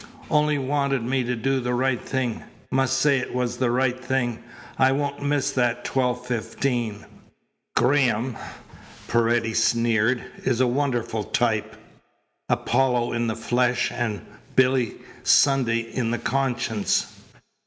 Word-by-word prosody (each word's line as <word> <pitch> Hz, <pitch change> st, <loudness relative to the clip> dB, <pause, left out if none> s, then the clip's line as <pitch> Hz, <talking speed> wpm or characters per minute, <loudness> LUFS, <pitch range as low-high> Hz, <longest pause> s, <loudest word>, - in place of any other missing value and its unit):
Only 150 Hz, -1 st, +3 dB
wanted 140 Hz, -2 st, 0 dB
me 130 Hz, +2 st, 0 dB
to 125 Hz, +1 st, -1 dB
do 135 Hz, +4 st, 0 dB
the 125 Hz, 0 st, -1 dB
right 125 Hz, -1 st, 0 dB
thing. 125 Hz, -4 st, -2 dB, 0.3 s
Must 135 Hz, 0 st, +2 dB
say 140 Hz, 0 st, +3 dB
it 125 Hz, -, -5 dB
was 125 Hz, -1 st, -1 dB
the 130 Hz, -2 st, +1 dB
right 130 Hz, +1 st, 0 dB
thing. 120 Hz, -2 st, -1 dB, 0.4 s
I 130 Hz, 0 st, +5 dB
won't 140 Hz, 0 st, -2 dB
miss 145 Hz, -1 st, 0 dB
that 120 Hz, -1 st, 0 dB
twelve 125 Hz, -1 st, 0 dB
fifteen." 120 Hz, -2 st, -2 dB, 0.7 s
"Graham," 125 Hz, -3 st, +2 dB, 0.7 s
Paredes 115 Hz, -1 st, +2 dB
sneered, 115 Hz, +1 st, +2 dB, 0.2 s
"is 115 Hz, -, +1 dB
a 130 Hz, -, +4 dB
wonderful 120 Hz, -4 st, -1 dB
type 120 Hz, -7 st, 0 dB, 0.7 s
Apollo 125 Hz, -1 st, +1 dB
in 120 Hz, 0 st, 0 dB
the 110 Hz, -, -1 dB
flesh 125 Hz, +1 st, +1 dB
and 120 Hz, -4 st, -3 dB, 0.3 s
Billy 130 Hz, -2 st, +3 dB, 0.3 s
Sunday 125 Hz, -5 st, +4 dB
in 120 Hz, -3 st, -1 dB
the 120 Hz, -, 0 dB
conscience." 120 Hz, -5 st, -1 dB
125 Hz, 130 wpm, -24 LUFS, 120-135 Hz, 0.7 s, I